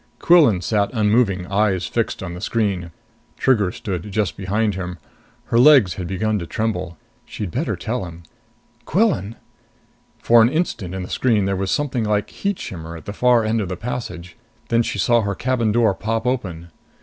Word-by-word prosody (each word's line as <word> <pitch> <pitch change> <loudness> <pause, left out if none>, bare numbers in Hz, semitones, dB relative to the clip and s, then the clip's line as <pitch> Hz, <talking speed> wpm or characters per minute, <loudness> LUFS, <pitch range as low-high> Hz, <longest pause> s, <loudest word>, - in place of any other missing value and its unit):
Quillan 150 - +5
sat 100 +2 +1
unmoving, 105 -4 +2
eyes 100 -2 +1
fixed 115 -1 -2
on 90 -2 -5
the 90 - -8
screen. 100 -6 -1 0.5
Trigger 105 -8 +2
stood 100 -1 -5
just 105 -1 -1
behind 105 +3 0
him. 90 -1 -5 0.5
Her 115 - +1
legs 130 - +6
had 90 0 -5
begun 105 +3 -1
to 85 - -6
tremble. 95 -6 -3 0.3
She'd 100 -5 -6
better 145 - -1
tell 120 0 -3
him. 85 0 -11 0.6
"Quillan 150 - +1 0.4
" - - -38
For 120 0 +6
an 115 - +5
instant, 130 - -2
in 95 - -4
the - - -6
screen, 110 -6 +1
there 100 0 0
was 95 0 -2
something 140 -5 0
like 105 -1 -1
heat 200 -2 -2
shimmer 85 -2 -7
at 80 - -13
the 100 - -5
far 120 0 +3
end 110 +1 +1
of 95 - -4
the 90 - -4
passage. 90 -8 -6 0.3
Then 115 0 +3
she 115 - -3
saw 120 +4 +3
her 100 -2 -2
cabin 120 -2 0
door 110 -2 +3
pop 110 +4 -3
open. 90 -10 -3
105 Hz, 185 wpm, -21 LUFS, 90-115 Hz, 0.6 s, legs